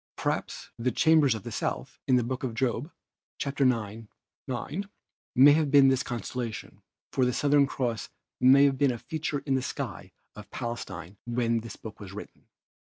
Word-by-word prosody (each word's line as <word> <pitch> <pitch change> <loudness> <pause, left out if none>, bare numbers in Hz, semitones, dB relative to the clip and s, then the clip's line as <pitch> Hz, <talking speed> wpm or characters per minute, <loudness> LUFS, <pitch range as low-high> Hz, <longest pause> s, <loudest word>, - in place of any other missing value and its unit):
Perhaps - - -3
"the 125 +2 +1
chambers 155 -6 +4
of 110 - -7
the - - -6
South'" - - -3
in 130 - +4
the 125 - +3
Book 130 +3 -4
of 120 -4 -3
Job 125 +4 -1 0.5
(ix, 140 0 -3
9) 115 -4 +1 1.3
may 145 +5 +7
be 145 0 +5
this 135 -1 +4
constellation, 120 -1 -5 0.3
for 130 - +1
the 125 - +3
Southern 145 +2 +3
Cross 120 -4 -3 0.3
must 130 +2 +7
have 140 -2 +3
been 140 -2 +4
a 120 - -4
feature 155 +1 -4
in 135 - +1
the 130 - +2
sky 130 - -5 0.2
of - - -11
Palestine 100 -5 -6
when 115 -1 +1
this 115 0 -8
book 110 -1 -10
was 100 -3 -9
written. 105 - -10
125 Hz, 165 wpm, -28 LUFS, 115-140 Hz, 1.3 s, may